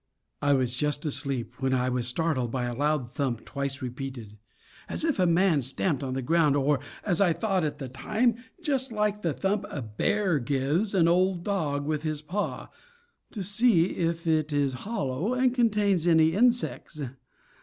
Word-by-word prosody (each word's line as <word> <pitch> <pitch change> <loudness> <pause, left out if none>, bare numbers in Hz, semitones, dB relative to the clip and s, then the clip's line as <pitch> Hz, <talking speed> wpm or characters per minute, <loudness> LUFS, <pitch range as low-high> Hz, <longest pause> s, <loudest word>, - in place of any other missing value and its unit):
I 145 -1 +3
was 130 -3 +1
just 150 +3 -1
asleep 135 -4 -2
when 130 0 +1
I 125 0 +1
was 125 -1 0
startled 130 -2 0
by 125 +1 -2
a 120 0 -2
loud 145 0 0
thump 125 -2 -3
twice 140 0 -4
repeated, 125 -4 -6 0.5
as - - -2
if 310 -10 0
a 180 - +4
man 170 -3 +3
stamped 135 +3 -1
on 130 -2 -3
the 135 - -2
ground, 155 0 +3
or, 145 0 +2 0.3
as 180 -3 +1
I 180 -4 +4
thought 195 -2 0
at 150 - -2
the 135 - -6
time, 220 - 0 0.3
just 270 -4 0
like 210 -1 0
the 170 - 0
thump 195 +6 -1
a 140 - -5
bear 165 - 0
gives 145 - 0
an 170 -3 +4
old 180 0 +2
log 150 -8 -1
with 155 -1 -1
his 155 -1 -3
paw, 195 +7 -4 0.6
to 205 - -5
see 205 -3 +3
if 165 -1 -1
it 155 -2 +1
is 140 -2 +1 0.2
hollow 175 - -1
and 255 -1 +2
contains 210 -7 +2
any 160 -1 +5
insects. 235 -7 +1
155 Hz, 175 wpm, -27 LUFS, 135-195 Hz, 0.6 s, any